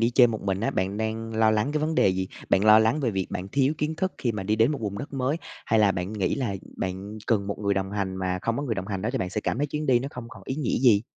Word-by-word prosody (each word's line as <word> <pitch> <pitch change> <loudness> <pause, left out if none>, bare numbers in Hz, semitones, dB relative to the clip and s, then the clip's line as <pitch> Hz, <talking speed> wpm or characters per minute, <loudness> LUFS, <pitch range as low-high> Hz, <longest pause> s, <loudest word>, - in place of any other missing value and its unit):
đi 115 +1 +3
chơi 125 0 +7
một 110 -2 -3
mình 95 -1 -1
á, 115 - +1
bạn 95 +2 -1
đang 110 +1 -3
lo 110 -1 +5
lắng 110 +6 +1
cái 150 - 0
vấn 155 +1 0
đề 100 - +4
gì? 95 0 -1 0.2
Bạn 100 - +4
lo 110 0 +8
lắng 110 +7 +2
về 125 -5 +1
việc 95 -2 -1
bạn 95 +2 -4
thiếu 135 +5 +2
kiến 150 +1 -1
thức 190 +2 -1
khi 120 -3 0
mà 100 -2 -4
đi 105 +3 0
đến 115 +6 +4
một 145 - -3
vùng 100 -2 -3
đất 145 - -7
mới, 135 +3 0 0.3
hay 110 - +3
là 105 -2 +5
bạn 90 +3 -3
nghĩ 100 -4 0
là 120 -8 -2 0.2
bạn 95 +3 -4
cần 100 -4 +1
một 100 - -3
người 100 -1 +1
đồng 95 0 -1
hành 100 -2 -2
mà 90 -1 -1
không 115 0 0
có 145 - -2
người 120 -6 -1
đồng 95 -1 -4
hành 100 -2 -3
đó 110 - 0
thì 135 - 0
bạn 90 -3 -2
sẽ 105 - -2
cảm 120 - -2
thấy 145 - +1
chuyến 150 +1 -3
đi 125 -2 +5
nó 135 +3 -4
không 120 -2 -8
còn - - -12
ý 130 - -2
nghĩa 145 -6 0
gì? 115 -5 +5
110 Hz, 330 wpm, -26 LUFS, 100-130 Hz, 0.3 s, lo